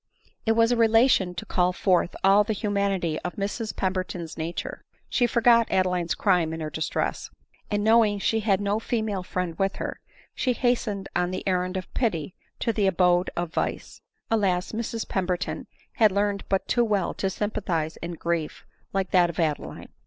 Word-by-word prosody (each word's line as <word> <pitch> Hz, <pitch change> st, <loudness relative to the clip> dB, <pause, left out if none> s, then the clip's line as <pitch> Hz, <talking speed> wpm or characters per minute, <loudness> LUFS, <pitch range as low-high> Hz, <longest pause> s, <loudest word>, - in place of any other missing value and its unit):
It 225 Hz, -, +5 dB
was 230 Hz, +1 st, +3 dB
a -, -, +3 dB
relation 225 Hz, -5 st, +4 dB
to 175 Hz, -, -5 dB
call 180 Hz, 0 st, +1 dB
forth 180 Hz, -2 st, +1 dB
all 195 Hz, +2 st, +6 dB
the 220 Hz, +1 st, -1 dB
humanity 200 Hz, -6 st, -1 dB
of 180 Hz, -, -5 dB
Mrs 210 Hz, +2 st, -3 dB
Pemberton's 185 Hz, -3 st, -3 dB
nature. 165 Hz, +2 st, -5 dB, 0.3 s
She 245 Hz, -, +2 dB
forgot 235 Hz, -1 st, +4 dB
Adeline's 180 Hz, -2 st, +1 dB
crime 180 Hz, -5 st, +2 dB
in 160 Hz, -, -5 dB
her 155 Hz, -1 st, -4 dB
distress; 160 Hz, +2 st, -2 dB, 0.4 s
and 205 Hz, -1 st, 0 dB
knowing 220 Hz, -1 st, +4 dB
she 220 Hz, +3 st, +1 dB
had 200 Hz, -3 st, +2 dB
no 205 Hz, +1 st, 0 dB
female 220 Hz, -4 st, -2 dB
friend 180 Hz, -2 st, -3 dB
with 195 Hz, 0 st, +1 dB
her, -, -, -5 dB, 0.3 s
she 255 Hz, -, 0 dB
hastened 230 Hz, -5 st, 0 dB
on 180 Hz, 0 st, +1 dB
the 185 Hz, -, -5 dB
errand 185 Hz, 0 st, 0 dB
of 185 Hz, -, -7 dB
pity 180 Hz, -, -1 dB, 0.3 s
to 230 Hz, -, +1 dB
the 205 Hz, -2 st, +2 dB
abode 180 Hz, -1 st, +3 dB
of 175 Hz, -1 st, -2 dB
vice. -, -, -3 dB, 0.3 s
Alas! 190 Hz, -5 st, +1 dB
Mrs 225 Hz, 0 st, -3 dB
Pem 190 Hz, -2 st, -1 dB
berton 180 Hz, +1 st, -2 dB, 0.3 s
had 215 Hz, -4 st, +5 dB
learned 200 Hz, 0 st, 0 dB
but 195 Hz, -1 st, 0 dB
too 240 Hz, -, +3 dB
well 205 Hz, -5 st, 0 dB
to 195 Hz, -, -1 dB
sympathize 180 Hz, -6 st, -2 dB
in 170 Hz, +1 st, -6 dB
grief 170 Hz, -1 st, -3 dB, 0.3 s
like 195 Hz, -1 st, -1 dB
that 175 Hz, -2 st, +4 dB
of 170 Hz, -, -6 dB
Adeline. 155 Hz, -3 st, -2 dB
195 Hz, 175 wpm, -26 LUFS, 180-215 Hz, 0.4 s, all